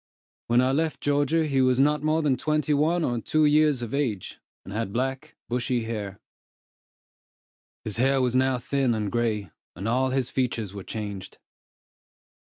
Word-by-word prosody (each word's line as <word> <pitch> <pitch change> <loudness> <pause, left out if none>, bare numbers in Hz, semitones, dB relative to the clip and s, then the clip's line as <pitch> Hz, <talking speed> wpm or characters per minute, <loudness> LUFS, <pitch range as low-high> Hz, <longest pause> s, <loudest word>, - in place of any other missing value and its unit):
When 120 +1 +4
I 130 +1 +2
left 155 +2 0
Georgia, 145 +3 +1
he 135 -3 +1
was 130 0 +3
not 150 +2 +3
more 155 +1 +1
than 140 -3 +2
twenty 150 +2 0
one 160 +4 +2
or 120 -5 -1
two 155 +5 +2
years 150 -3 +3
of 115 - -6
age, 125 -10 -2 0.3
and 95 - -8
had 110 -2 -2
black, 130 +4 -3
bushy 125 0 -1
hair. 105 -4 -5 1.6
His 105 -1 -5
hair 135 +2 +3
was 125 -1 +1
now 130 0 +3
thin 130 -1 0
and 105 -2 -2
gray, 110 -6 -1 0.2
and 95 +5 -5
all 130 +3 +2
his 130 -1 -1
features 115 -6 -2
were 100 -2 -7
changed. 100 -3 -6
130 Hz, 160 wpm, -26 LUFS, 115-145 Hz, 1.6 s, When